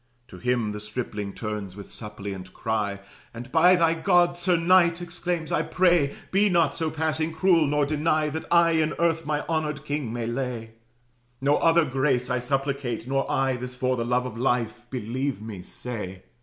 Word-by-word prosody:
To 90 Hz, -, -11 dB
him 120 Hz, -2 st, 0 dB
the 105 Hz, -, -5 dB
stripling 105 Hz, -2 st, -4 dB
turns, 105 Hz, -3 st, -5 dB
with 100 Hz, -1 st, -10 dB
suppliant 100 Hz, -4 st, -7 dB
cry, 105 Hz, -3 st, -2 dB, 0.3 s
And, 120 Hz, +2 st, -8 dB
"By 175 Hz, +3 st, +6 dB
thy 165 Hz, -2 st, +3 dB
God, 175 Hz, 0 st, +3 dB
sir 175 Hz, 0 st, +1 dB
knight," 170 Hz, 0 st, +4 dB
exclaims, 175 Hz, -1 st, -3 dB
"I -, -, +2 dB
pray, 175 Hz, -6 st, +2 dB, 0.2 s
Be 205 Hz, +2 st, +4 dB
not 170 Hz, -3 st, +3 dB
so 160 Hz, -1 st, -1 dB
passing 160 Hz, 0 st, -1 dB
cruel, 165 Hz, -1 st, +3 dB
nor 145 Hz, 0 st, +2 dB
deny 155 Hz, +1 st, +1 dB
That 160 Hz, +2 st, -5 dB
I 170 Hz, -1 st, +5 dB
in 160 Hz, -1 st, +1 dB
earth 165 Hz, -2 st, +1 dB
my 150 Hz, -1 st, -1 dB
honored 150 Hz, -2 st, -2 dB
king 145 Hz, -5 st, -2 dB
may 120 Hz, -1 st, -3 dB
lay: 120 Hz, -2 st, -3 dB, 0.7 s
No 140 Hz, +2 st, +3 dB
other 165 Hz, 0 st, +4 dB
grace 130 Hz, -2 st, 0 dB
I 125 Hz, -, +1 dB
supplicate, 135 Hz, -2 st, -2 dB
nor 135 Hz, +1 st, 0 dB
I 135 Hz, -1 st, +1 dB
This 125 Hz, +1 st, -7 dB
for 130 Hz, 0 st, 0 dB
the 120 Hz, -, -2 dB
love 125 Hz, +1 st, +1 dB
of 115 Hz, -3 st, -6 dB
life, 120 Hz, -1 st, -1 dB
believe 130 Hz, +1 st, -3 dB
me, 105 Hz, -4 st, -7 dB
say. 95 Hz, -3 st, -6 dB
135 Hz, 180 wpm, -25 LUFS, 115-160 Hz, 0.7 s, By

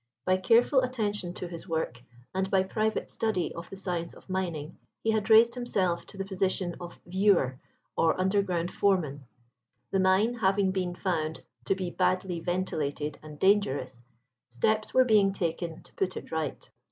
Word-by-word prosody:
By 185 Hz, 0 st, +3 dB
careful 235 Hz, +8 st, +4 dB
attention 210 Hz, -8 st, -2 dB
to 180 Hz, -, -5 dB
his 170 Hz, +1 st, -8 dB
work, 160 Hz, -7 st, -2 dB, 0.3 s
and 190 Hz, 0 st, 0 dB
by 190 Hz, -1 st, +3 dB
private 215 Hz, +3 st, -1 dB
study 215 Hz, -6 st, -1 dB
of 170 Hz, +1 st, -8 dB
the 195 Hz, -, -8 dB
science 175 Hz, -3 st, -3 dB
of -, -, -13 dB
mining, 170 Hz, -5 st, -3 dB, 0.2 s
he 225 Hz, -, +2 dB
had 220 Hz, -1 st, 0 dB
raised 230 Hz, +2 st, +7 dB
himself 195 Hz, -8 st, -1 dB
to 200 Hz, -, -11 dB
the 195 Hz, -, -3 dB
position 190 Hz, -2 st, -1 dB
of 175 Hz, -1 st, -9 dB
"viewer" 180 Hz, -8 st, +2 dB, 0.4 s
or 165 Hz, +2 st, +2 dB
underground 185 Hz, -2 st, +1 dB
foreman. 155 Hz, -9 st, +1 dB, 0.7 s
The 195 Hz, -, +2 dB
mine 190 Hz, +5 st, +4 dB
having 195 Hz, -4 st, +2 dB
been 180 Hz, -2 st, -2 dB
found 160 Hz, -4 st, -2 dB, 0.2 s
to 195 Hz, -, +2 dB
be 185 Hz, -2 st, -3 dB
badly 185 Hz, -1 st, 0 dB
ventilated 155 Hz, -5 st, -2 dB
and 150 Hz, -1 st, -10 dB
dangerous, 140 Hz, -, +2 dB, 0.5 s
steps 215 Hz, -, 0 dB
were 260 Hz, 0 st, +5 dB
being 205 Hz, -4 st, +4 dB
taken 165 Hz, -2 st, -3 dB
to -, -, -17 dB
put 185 Hz, -1 st, -1 dB
it -, -, -8 dB
right. 160 Hz, -3 st, -3 dB
185 Hz, 165 wpm, -29 LUFS, 170-200 Hz, 0.7 s, raised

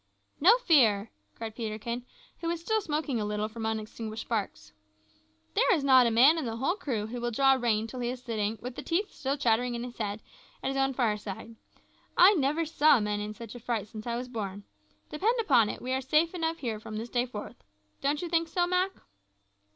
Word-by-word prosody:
"No 395 Hz, +11 st, +7 dB
fear," 235 Hz, -, +3 dB, 0.2 s
cried 225 Hz, -1 st, -6 dB
Peterkin, 235 Hz, +2 st, -4 dB, 0.3 s
who 335 Hz, -, -4 dB
was 340 Hz, 0 st, -1 dB
still 440 Hz, +6 st, 0 dB
smoking 300 Hz, -, -2 dB
a -, -, -1 dB
little 210 Hz, 0 st, -1 dB
from 220 Hz, 0 st, -5 dB
unextinguished 220 Hz, 0 st, -4 dB
sparks. 200 Hz, -, -4 dB, 0.8 s
"There -, -, +4 dB
is 300 Hz, -, -2 dB
not 260 Hz, -3 st, +6 dB
a -, -, +3 dB
man 265 Hz, +9 st, +6 dB
in 300 Hz, -, -3 dB
the 225 Hz, -1 st, -3 dB
whole 265 Hz, +9 st, 0 dB
crew 250 Hz, -, -3 dB
who 240 Hz, +2 st, -6 dB
will 240 Hz, -, 0 dB
draw 270 Hz, +3 st, +4 dB
rein 230 Hz, -4 st, +1 dB
till 250 Hz, +3 st, -7 dB
he 240 Hz, -1 st, -1 dB
is 250 Hz, 0 st, -4 dB
sitting, 220 Hz, -2 st, -2 dB
with 250 Hz, 0 st, -5 dB
the -, -, -5 dB
teeth 385 Hz, +5 st, -1 dB
still 275 Hz, +1 st, -2 dB
chattering 245 Hz, -1 st, +1 dB
in 235 Hz, -, -4 dB
his 245 Hz, -1 st, -8 dB
head, 210 Hz, 0 st, -3 dB, 0.4 s
at -, -, 0 dB
his 270 Hz, -, -3 dB
own 270 Hz, -1 st, +1 dB
fireside. 215 Hz, -2 st, -2 dB, 0.6 s
I 370 Hz, +4 st, +8 dB
never 305 Hz, 0 st, +1 dB
saw 305 Hz, -3 st, +4 dB
men 210 Hz, -1 st, -1 dB
in 210 Hz, +1 st, -5 dB
such 230 Hz, -2 st, -9 dB
a 245 Hz, -, -9 dB
fright 225 Hz, -3 st, -3 dB
since 215 Hz, 0 st, -8 dB
I 235 Hz, -, -1 dB
was 250 Hz, +1 st, -4 dB
born. 205 Hz, -5 st, -5 dB, 0.5 s
Depend 440 Hz, +10 st, +1 dB
upon 250 Hz, -, +4 dB
it, -, -, -6 dB
we 255 Hz, +1 st, -2 dB
are 265 Hz, -, 0 dB
safe 305 Hz, +6 st, +2 dB
enough 330 Hz, -2 st, -1 dB
here 230 Hz, -7 st, -3 dB
from 215 Hz, 0 st, -7 dB
this 230 Hz, +2 st, -5 dB
day 245 Hz, +1 st, 0 dB
forth. 210 Hz, -, -8 dB, 0.4 s
Don't 290 Hz, +3 st, 0 dB
you -, -, -2 dB
think 335 Hz, -1 st, +1 dB
so, 350 Hz, +2 st, +1 dB
Mak?" 365 Hz, +2 st, +1 dB
245 Hz, 215 wpm, -29 LUFS, 220-300 Hz, 0.8 s, I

